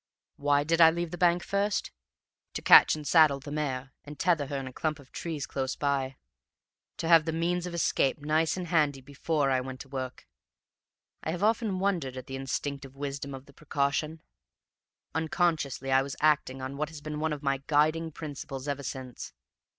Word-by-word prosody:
"Why 145 0 +2
did 165 +2 +2
I 165 - +10
leave 170 0 -3
the 175 - -5
bank 175 0 +3
first? 200 +1 -1 0.6
To - - -4
catch - - +8
and 155 -1 -8
saddle 155 -4 +5
the 145 +1 -9
mare 135 -3 -3
and 150 0 -10
tether 165 -6 +1
her 140 - -3
in 135 - -4
a 130 - -8
clump 155 +2 -2
of 140 -3 -17
trees 160 -5 -4
close 135 -1 -3
by: 135 -2 -1 0.8
to 165 - -3
have 165 -2 +6
the 165 - -1
means 175 +2 -1
of 175 - -5
escape 135 -5 +1
nice 155 +4 +1
and 180 -2 -5
handy 150 -5 +2
before 140 +1 -1
I 130 -1 +2
went 130 0 -7
to 135 - -11
work. 130 -2 -6 0.9
I - - -4
have 175 +4 -2
often 220 -2 +2
wondered 175 -10 -1
at 130 - -7
the 135 - -6
instinctive 135 0 -4
wisdom 140 0 -5
of 135 0 -11
the 140 - -18
precaution; 150 +2 -2 0.9
unconsciously 160 -5 0
I 135 0 +5
was 135 0 -5
acting 145 -4 +2
on 135 +1 -5
what 150 +1 -2
has 160 -2 -10
been 150 0 -5
one 160 0 0
of 150 -1 -4
my 135 -1 0
guiding 155 +2 +2
principles 140 -3 -7
ever 140 -1 -2
since. 130 -2 -7
145 Hz, 190 wpm, -29 LUFS, 135-160 Hz, 0.9 s, I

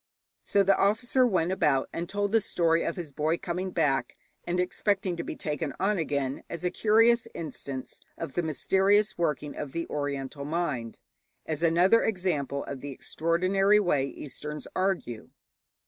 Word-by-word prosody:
So 200 - +3
the 195 0 +4
officer 245 +5 +3
went 180 -5 +1
about 145 -7 +2
and 170 +1 -4
told 205 0 -1
the 225 0 +4
story 165 -4 +1
of - - -2
his 170 -5 -6
boy 155 +4 0
coming 180 +2 -3
back, 150 -6 0 0.3
and 175 +1 -1
expecting 190 0 0
to 170 - -4
be - - -5
taken 150 -1 -3
on 195 0 +1
again, 140 -4 -2
as 170 0 -6
a 180 - +1
curious 230 +2 +4
instance 140 -5 -6 0.2
of 135 - -5
the 175 - +1
mysterious 195 +6 +2
working 150 -3 -1
of 145 -3 -6
the 170 0 -2
Oriental 140 -1 -3
mind, 145 -7 -2 0.5
as 155 -1 -3
another 175 +7 +5
example 170 -9 -1
of 135 -2 -7
the 145 - -6
extraordinary 185 +8 +2
way 150 -9 +1
Easterns 150 +2 -7
argue. 185 - -1
170 Hz, 160 wpm, -28 LUFS, 145-195 Hz, 0.5 s, another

